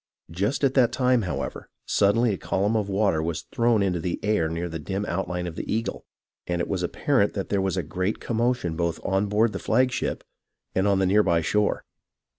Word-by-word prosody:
Just 100 Hz, -, -1 dB
at 135 Hz, -1 st, +3 dB
that 125 Hz, -4 st, +4 dB
time, 125 Hz, -2 st, +2 dB
however, 90 Hz, -4 st, -4 dB, 0.2 s
suddenly 105 Hz, +3 st, +3 dB
a -, -, -3 dB
column 100 Hz, +4 st, 0 dB
of 105 Hz, -2 st, 0 dB
water 95 Hz, -5 st, +2 dB
was 80 Hz, 0 st, -3 dB
thrown 115 Hz, -3 st, +2 dB
into 90 Hz, -3 st, 0 dB
the 85 Hz, +1 st, -3 dB
air 105 Hz, -6 st, +1 dB
near 85 Hz, +2 st, -3 dB
the 80 Hz, -1 st, -5 dB
dim 95 Hz, +6 st, -3 dB
outline 90 Hz, -1 st, -2 dB
of 85 Hz, -2 st, -5 dB
the -, -, -5 dB
Eagle, 115 Hz, +2 st, -2 dB, 0.4 s
and 90 Hz, -1 st, -1 dB
it 85 Hz, -, -1 dB
was 95 Hz, -3 st, -2 dB
apparent 105 Hz, +5 st, +1 dB
that 100 Hz, -, -3 dB
there 100 Hz, -1 st, +1 dB
was 95 Hz, 0 st, -1 dB
a 90 Hz, -, 0 dB
great 90 Hz, +7 st, -2 dB
commotion 115 Hz, -7 st, 0 dB
both 85 Hz, 0 st, -1 dB
on 95 Hz, +1 st, +1 dB
board 105 Hz, +2 st, +2 dB
the 95 Hz, -, -3 dB
flagship 125 Hz, +3 st, 0 dB, 0.5 s
and 95 Hz, +2 st, +1 dB
on 100 Hz, -1 st, +3 dB
the 95 Hz, -, +2 dB
near 100 Hz, +3 st, +4 dB
by 85 Hz, -5 st, +2 dB
shore. 105 Hz, +5 st, 0 dB
100 Hz, 210 wpm, -25 LUFS, 90-110 Hz, 0.5 s, that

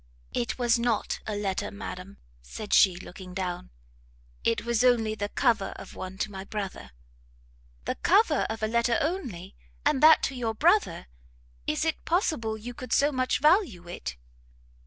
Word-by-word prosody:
"It 240 Hz, -, -1 dB
was 240 Hz, -1 st, +2 dB
not 235 Hz, -2 st, 0 dB
a 215 Hz, -, -2 dB
letter, 200 Hz, -2 st, -2 dB
madam," 200 Hz, -2 st, -8 dB, 0.2 s
said 205 Hz, -, -6 dB
she, 190 Hz, -3 st, +6 dB
looking 180 Hz, 0 st, -10 dB
down, 180 Hz, -, -3 dB, 0.7 s
"it 230 Hz, -1 st, +1 dB
was 235 Hz, 0 st, +1 dB
only 230 Hz, -4 st, +3 dB
the 205 Hz, -1 st, -3 dB
cover 225 Hz, -6 st, +1 dB
of -, -, -10 dB
one 185 Hz, 0 st, -7 dB
to 210 Hz, -, -2 dB
my 190 Hz, -1 st, -6 dB
brother." 195 Hz, -, -5 dB, 1.0 s
"The -, -, 0 dB
cover 370 Hz, -, +3 dB
of 220 Hz, 0 st, -4 dB
a -, -, +2 dB
letter 235 Hz, +1 st, +2 dB
only! 275 Hz, -, -3 dB, 0.3 s
and 265 Hz, -, +2 dB
that 315 Hz, +1 st, +7 dB
to -, -, 0 dB
your 230 Hz, -3 st, -2 dB
brother! 350 Hz, -, +2 dB, 0.6 s
is 155 Hz, -, 0 dB
it 320 Hz, -, -1 dB
possible 310 Hz, -, 0 dB
you 240 Hz, +3 st, -7 dB
could 255 Hz, +1 st, -5 dB
so 290 Hz, +2 st, +4 dB
much 255 Hz, -2 st, 0 dB
value 300 Hz, -, +3 dB
it?" 65 Hz, -, -6 dB
225 Hz, 160 wpm, -27 LUFS, 195-255 Hz, 1.0 s, that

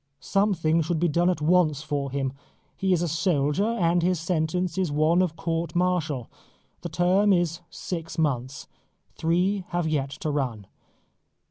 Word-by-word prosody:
Something 170 Hz, -3 st, +1 dB
should 160 Hz, +1 st, -1 dB
be 175 Hz, -, +2 dB
done 170 Hz, +3 st, +2 dB
at 175 Hz, -4 st, -1 dB
once 155 Hz, -3 st, +3 dB
for 145 Hz, -2 st, -2 dB
him. 135 Hz, -1 st, -2 dB, 0.4 s
He 190 Hz, 0 st, 0 dB
is 175 Hz, -2 st, +2 dB
a -, -, 0 dB
soldier, 160 Hz, +2 st, +1 dB
and 175 Hz, -7 st, +1 dB
his 180 Hz, 0 st, +1 dB
sentence 170 Hz, +1 st, -1 dB
is 185 Hz, -5 st, 0 dB
one 155 Hz, +4 st, +3 dB
of 175 Hz, -4 st, 0 dB
court 165 Hz, 0 st, -3 dB
martial. 175 Hz, -8 st, 0 dB, 0.5 s
The 175 Hz, -, -5 dB
term 180 Hz, +5 st, +3 dB
is 175 Hz, -2 st, +1 dB
six 165 Hz, -2 st, -6 dB
months. 135 Hz, -4 st, -1 dB, 0.5 s
Three 180 Hz, +4 st, +1 dB
have 175 Hz, -2 st, -1 dB
yet 145 Hz, -3 st, 0 dB
to 155 Hz, -, -1 dB
run. 125 Hz, -8 st, -2 dB
165 Hz, 155 wpm, -26 LUFS, 150-180 Hz, 0.5 s, once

